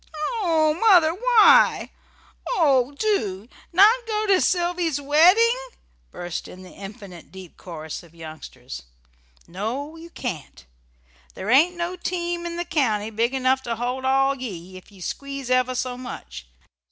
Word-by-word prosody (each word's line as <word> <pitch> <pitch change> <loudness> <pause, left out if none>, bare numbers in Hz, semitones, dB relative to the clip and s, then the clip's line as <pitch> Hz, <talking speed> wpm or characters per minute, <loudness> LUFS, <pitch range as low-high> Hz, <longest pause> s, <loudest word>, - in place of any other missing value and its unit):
"Oh, 320 -4 +2
Mother! 355 -8 +5
Why? 485 +3 +4 0.6
Oh, 275 - +3
do! 220 - -1 0.2
Not 435 +7 +5
go 430 -1 -1
to 385 -3 +3
Sylvy's 345 -4 0
wedding?" 360 - +4 0.5
burst 175 -1 -6
in 185 +1 -12
the 185 - -13
"infinite 195 - -11
deep 185 -2 -12
chorus" 160 -3 -8
of 170 -1 -19
youngsters. 155 - -10 0.7
"No, 240 - -5
you 335 +1 -11
can't. 180 - -7 0.7
There 210 - -3
ain't 325 +8 +5
no 345 +1 -3
team 345 -1 -3
in 340 - -5
the 345 - -3
county 225 -10 0
big 230 +4 0
enough 260 0 +1
to 235 -2 -3
hold 250 +3 -3
ye 260 - +1
all, 270 +1 +3 0.4
if 185 +2 -13
ye 195 -2 -16
squeeze 275 +5 -5
ever 255 0 +2
so 250 0 -3
much. 150 - -9
270 Hz, 140 wpm, -23 LUFS, 210-345 Hz, 0.7 s, Mother